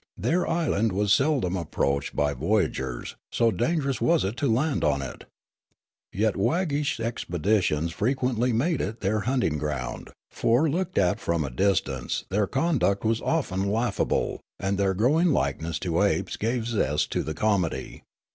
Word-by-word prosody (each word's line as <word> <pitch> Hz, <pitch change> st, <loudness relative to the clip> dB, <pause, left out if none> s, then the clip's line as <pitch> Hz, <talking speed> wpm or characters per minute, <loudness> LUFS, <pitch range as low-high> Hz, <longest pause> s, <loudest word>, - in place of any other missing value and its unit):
Their 180 Hz, +3 st, 0 dB
island 150 Hz, -, +1 dB
was 100 Hz, +1 st, +2 dB
seldom 135 Hz, -, +2 dB
approached 70 Hz, -5 st, -1 dB
b}' 70 Hz, 0 st, +1 dB
voyagers, 70 Hz, -, -1 dB
so 115 Hz, -1 st, +2 dB
dangerous 135 Hz, +3 st, 0 dB
was 170 Hz, -1 st, +3 dB
it 100 Hz, +4 st, -2 dB
to 140 Hz, -5 st, +1 dB
land 140 Hz, +6 st, +1 dB
on 70 Hz, 0 st, +1 dB
it. 65 Hz, -, -8 dB, 0.9 s
Yet 105 Hz, +2 st, +1 dB
wag 160 Hz, -, +1 dB
gish 145 Hz, -3 st, -1 dB
expeditions 90 Hz, -6 st, 0 dB
frequently 125 Hz, +3 st, 0 dB
made 145 Hz, +9 st, +1 dB
it 110 Hz, +4 st, -4 dB
their 105 Hz, +2 st, +1 dB
hunting 120 Hz, -, 0 dB
ground; 70 Hz, -5 st, -4 dB, 0.2 s
for 120 Hz, +7 st, +2 dB
looked 180 Hz, +4 st, -2 dB
at 90 Hz, -2 st, +2 dB
from 85 Hz, -2 st, 0 dB
a 70 Hz, -, -4 dB
distance 65 Hz, -5 st, 0 dB
their 100 Hz, +1 st, +1 dB
conduct 110 Hz, -, +1 dB
was 115 Hz, +1 st, +1 dB
often 100 Hz, -, 0 dB
laughable, 110 Hz, -2 st, 0 dB, 0.2 s
and 95 Hz, 0 st, -1 dB
their 95 Hz, -1 st, +2 dB
growing 145 Hz, -, +3 dB
likeness 80 Hz, -, 0 dB
to -, -, 0 dB
apes -, -, +1 dB
gave 115 Hz, +1 st, -1 dB
zest 75 Hz, -, 0 dB
to -, -, 0 dB
the 80 Hz, -, -4 dB
comedy. 100 Hz, -5 st, -1 dB
105 Hz, 155 wpm, -26 LUFS, 85-130 Hz, 0.9 s, was